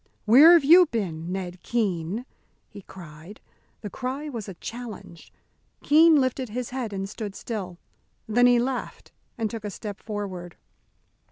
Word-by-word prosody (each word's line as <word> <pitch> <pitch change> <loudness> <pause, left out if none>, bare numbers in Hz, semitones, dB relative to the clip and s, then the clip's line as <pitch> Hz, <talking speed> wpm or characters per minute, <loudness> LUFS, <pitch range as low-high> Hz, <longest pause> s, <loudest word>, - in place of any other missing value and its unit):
"Where 275 +10 +8
have 335 -4 +5
you 350 +4 +7
been, 180 - -4
Ned 180 -2 -5
Keene?" 205 -1 -2 0.4
he 200 - -12
cried. 170 +1 -13 0.4
The 205 - -6
cry 270 +4 -5
was 225 -7 -6
a 190 - -8
challenge. 230 -6 -9 0.5
Keene 320 +2 +6
lifted 260 -2 0
his 245 +3 -5
head 250 -4 -4
and 195 -1 -4
stood 205 -1 -7
still. 190 -6 -6 0.5
Then 245 +3 +4
he 245 -1 +5
laughed 250 +1 -4 0.3
and 225 -2 -1
took 225 0 -7
a 210 - -4
step 205 0 -8
forward. 190 -5 -6
215 Hz, 150 wpm, -25 LUFS, 190-250 Hz, 0.5 s, Where